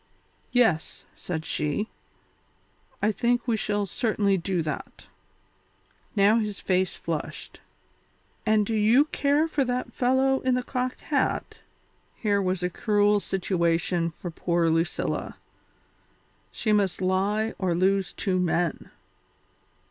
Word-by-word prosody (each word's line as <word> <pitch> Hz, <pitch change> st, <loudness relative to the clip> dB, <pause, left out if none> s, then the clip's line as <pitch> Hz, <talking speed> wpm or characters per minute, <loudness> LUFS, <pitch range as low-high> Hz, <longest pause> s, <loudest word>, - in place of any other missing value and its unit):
"Yes," 225 Hz, -11 st, +1 dB
said 160 Hz, -3 st, -5 dB
she, 150 Hz, +8 st, -1 dB, 1.2 s
"I 215 Hz, -, +4 dB
think 240 Hz, +3 st, 0 dB
we 230 Hz, -, +2 dB
shall 205 Hz, -1 st, -1 dB
certainly 205 Hz, -2 st, +1 dB
do 180 Hz, -1 st, -1 dB
that." 155 Hz, -, -6 dB, 1.1 s
Now 210 Hz, +3 st, +5 dB
his 210 Hz, -2 st, -3 dB
face 185 Hz, 0 st, 0 dB
flushed. -, -, -5 dB, 0.8 s
"And 215 Hz, -1 st, +3 dB
do 225 Hz, -, -2 dB
you 220 Hz, +7 st, +4 dB
care 295 Hz, +1 st, +1 dB
for 295 Hz, -3 st, 0 dB
that 250 Hz, 0 st, -3 dB
fellow 265 Hz, +1 st, +2 dB
in 260 Hz, -1 st, +1 dB
the 250 Hz, -, -1 dB
cocked 255 Hz, 0 st, -3 dB
hat?" -, -, -1 dB, 0.6 s
Here 205 Hz, -2 st, +1 dB
was 185 Hz, -1 st, -1 dB
a 180 Hz, -, +1 dB
cruel 205 Hz, +1 st, +2 dB
situation 175 Hz, -3 st, 0 dB
for 170 Hz, +2 st, -8 dB
poor 170 Hz, 0 st, +1 dB
Lucilla. 165 Hz, +1 st, -1 dB, 1.1 s
She 215 Hz, -, 0 dB
must 195 Hz, -4 st, +1 dB
lie 195 Hz, +4 st, 0 dB
or 180 Hz, -3 st, 0 dB
lose 190 Hz, +1 st, +1 dB
two 185 Hz, -2 st, -1 dB
men. 175 Hz, -1 st, 0 dB
200 Hz, 120 wpm, -26 LUFS, 180-230 Hz, 1.2 s, Now